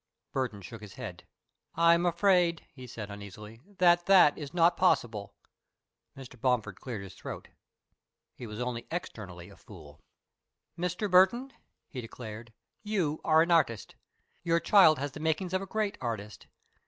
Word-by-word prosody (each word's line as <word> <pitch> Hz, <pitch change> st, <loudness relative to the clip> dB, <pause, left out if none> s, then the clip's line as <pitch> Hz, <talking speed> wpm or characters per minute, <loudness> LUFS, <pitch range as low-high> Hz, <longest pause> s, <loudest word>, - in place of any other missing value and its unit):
Burton 120 Hz, -7 st, -3 dB
shook 115 Hz, +4 st, -10 dB
his 105 Hz, -2 st, -11 dB
head. -, -, -8 dB, 0.5 s
"I 170 Hz, +1 st, +5 dB
am 170 Hz, +1 st, +2 dB
afraid," 175 Hz, -1 st, +2 dB
he 130 Hz, -2 st, -11 dB
said, 110 Hz, -4 st, -8 dB
uneasily, 105 Hz, +2 st, -10 dB, 0.2 s
"that 175 Hz, -1 st, +4 dB
that 185 Hz, -6 st, +6 dB
is 145 Hz, -3 st, -7 dB
not 170 Hz, 0 st, +3 dB
possible." 115 Hz, -, 0 dB, 0.8 s
Mr. 125 Hz, -3 st, -12 dB
Bomford 115 Hz, -7 st, 0 dB
cleared 115 Hz, -6 st, -6 dB
his 95 Hz, -, -10 dB
throat. -, -, -8 dB, 0.8 s
He 120 Hz, -, -9 dB
was 105 Hz, +1 st, -8 dB
only 125 Hz, -1 st, -4 dB
externally 100 Hz, -, -7 dB
a -, -, -14 dB
fool. 80 Hz, -10 st, -14 dB, 0.8 s
"Mr. 180 Hz, +4 st, -2 dB
Burton," 200 Hz, +8 st, +4 dB, 0.3 s
he 130 Hz, -, -7 dB
declared, 115 Hz, -1 st, -9 dB, 0.3 s
"you 185 Hz, -8 st, -1 dB
are 160 Hz, 0 st, +5 dB
an 170 Hz, -, -2 dB
artist. 115 Hz, -, +1 dB, 0.5 s
Your 170 Hz, -1 st, +2 dB
child 170 Hz, -2 st, +6 dB
has 140 Hz, +1 st, -3 dB
the 155 Hz, -, -9 dB
makings 160 Hz, +4 st, -1 dB
of 185 Hz, -, +1 dB
a 195 Hz, -, -7 dB
great 215 Hz, 0 st, -2 dB
artist. 105 Hz, -5 st, -5 dB
140 Hz, 155 wpm, -29 LUFS, 110-175 Hz, 0.8 s, that